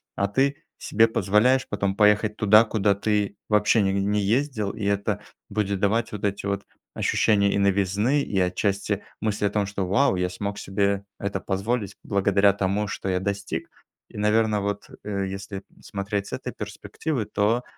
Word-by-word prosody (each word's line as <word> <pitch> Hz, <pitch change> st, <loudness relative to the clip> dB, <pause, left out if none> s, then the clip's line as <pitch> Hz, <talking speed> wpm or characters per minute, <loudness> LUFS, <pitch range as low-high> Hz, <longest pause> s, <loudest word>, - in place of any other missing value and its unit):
а 100 Hz, -, +1 dB
ты 135 Hz, +7 st, 0 dB, 0.2 s
себе 115 Hz, +2 st, +3 dB
позволяешь 110 Hz, +6 st, +2 dB
потом 100 Hz, -1 st, -1 dB
поехать 105 Hz, +1 st, +3 dB
туда, 105 Hz, +1 st, +6 dB
куда 105 Hz, -3 st, +1 dB
ты 105 Hz, 0 st, 0 dB
вообще 105 Hz, +1 st, +4 dB
не 95 Hz, -1 st, +1 dB
не 100 Hz, +1 st, +1 dB
ездил, 110 Hz, -1 st, 0 dB
и 105 Hz, -, -7 dB
это 100 Hz, 0 st, 0 dB, 0.3 s
будет 100 Hz, -2 st, -1 dB
давать 110 Hz, +4 st, +1 dB
вот 105 Hz, -1 st, -7 dB
эти 100 Hz, 0 st, -1 dB
вот 100 Hz, 0 st, -2 dB, 0.3 s
ощущения 100 Hz, -2 st, +2 dB
и -, -, +1 dB
новизны, 100 Hz, +7 st, +2 dB
и 100 Hz, -7 st, -1 dB
отчасти 100 Hz, +2 st, 0 dB, 0.2 s
мысли 105 Hz, -1 st, 0 dB
о -, -, +3 dB
том, 105 Hz, 0 st, 0 dB
что: 100 Hz, -1 st, -3 dB
"Вау, 130 Hz, +5 st, +3 dB
я 90 Hz, 0 st, 0 dB
смог 100 Hz, +2 st, -4 dB
себе 100 Hz, 0 st, 0 dB, 0.2 s
это 100 Hz, 0 st, -2 dB
позволить 100 Hz, +2 st, -2 dB
благодаря 100 Hz, 0 st, +3 dB
тому, 100 Hz, +1 st, -1 dB
что 95 Hz, -, -5 dB
я 90 Hz, 0 st, +1 dB
достиг". 100 Hz, +1 st, -3 dB, 0.4 s
И, -, -, -12 dB
наверно, 105 Hz, 0 st, +2 dB
вот, 100 Hz, 0 st, -3 dB
э, 100 Hz, -2 st, -2 dB
если 95 Hz, +1 st, -6 dB, 0.2 s
смотреть 100 Hz, 0 st, -3 dB
с -, -, -9 dB
этой -, -, -5 dB
перспективы, 145 Hz, -9 st, -4 dB
то 105 Hz, +4 st, +1 dB
100 Hz, 170 wpm, -25 LUFS, 100-105 Hz, 0.4 s, туда